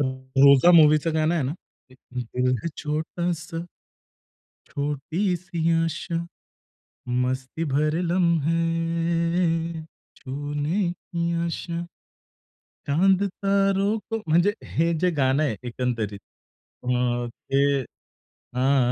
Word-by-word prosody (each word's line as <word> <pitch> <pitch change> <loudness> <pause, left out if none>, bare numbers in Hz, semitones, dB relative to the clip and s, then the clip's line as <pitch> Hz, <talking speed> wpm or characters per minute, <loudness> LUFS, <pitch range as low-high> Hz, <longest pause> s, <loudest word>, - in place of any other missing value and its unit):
रोजा 135 +3 +4
मूव्हीचं 155 0 +5
गाणं 155 +2 +2
आहे 165 - +1
ना 135 - -1 0.4
की - - -17 0.4
दिल 125 0 +1
है 170 - -1
छोटासा, 165 +2 -3 1.1
छोटी 150 +7 -1
सी 170 -2 -2
आशा, 165 +2 -3 1.1
मस्ती 130 +5 -2
भरे 155 +4 +1
लम्हे 165 0 +1 0.3
छूने 145 +7 -2
की 170 -1 -3
आशा, 170 0 -3 1.0
चांद 185 +7 +3
तारो 195 +1 +1
को 225 - -1
म्हणजे 175 +6 +3 0.2
हे 165 +2 +1
जे 180 -1 +3
गाणं 135 +2 +3
आहे 125 -7 -1
एकंदरीत 115 -5 -3 0.6
अ, - - -4 0.4
ते 140 +3 0 0.7
हां, 135 +1 +3
165 Hz, 95 wpm, -24 LUFS, 140-170 Hz, 1.1 s, मूव्हीचं